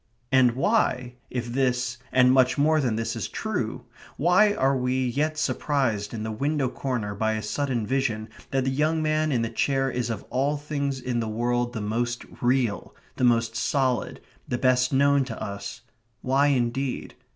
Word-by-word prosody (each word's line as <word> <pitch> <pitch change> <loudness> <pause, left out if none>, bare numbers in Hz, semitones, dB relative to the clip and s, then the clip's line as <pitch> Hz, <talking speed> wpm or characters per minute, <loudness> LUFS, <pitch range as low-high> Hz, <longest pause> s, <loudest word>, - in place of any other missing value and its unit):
And 130 -2 +5
why, 125 - +1 0.2
if 125 -2 -3
this 125 -2 0
and 125 0 +5
much 130 0 +4
more 155 +2 +3
than 120 -5 0
this 115 0 -2
is - - -3
true, - - -3 0.3
why 180 +7 +4
are 135 -6 +2
we 130 0 0
yet 150 +5 -1
surprised 130 -9 0
in 110 -2 -5
the 110 - -3
window 140 +4 0
corner 120 -6 -3
by 110 +2 0
a 110 -1 -3
sudden 125 -1 -1
vision 115 -4 -1 0.2
that 135 -1 0
the 135 - 0
young 155 +3 +1
man 155 0 +1
in 120 -4 +1
the 115 - -1
chair 135 +3 +1
is 120 -2 -2
of 110 -3 -4
all 140 +4 +1
things 140 -2 -3
in 125 -1 -2
the 115 - -2
world 120 +2 -1
the 110 - -4
most 120 +3 -2 0.2
real, 120 -4 0 0.2
the - - -1
most 115 -2 +3
solid, 130 +1 0 0.3
the 120 - -1
best 125 0 +2
known 140 +1 +4
to 115 -4 -7
us 100 +5 -6 0.4
why 135 +3 +3
indeed? 130 0 -1
130 Hz, 175 wpm, -25 LUFS, 120-140 Hz, 0.4 s, And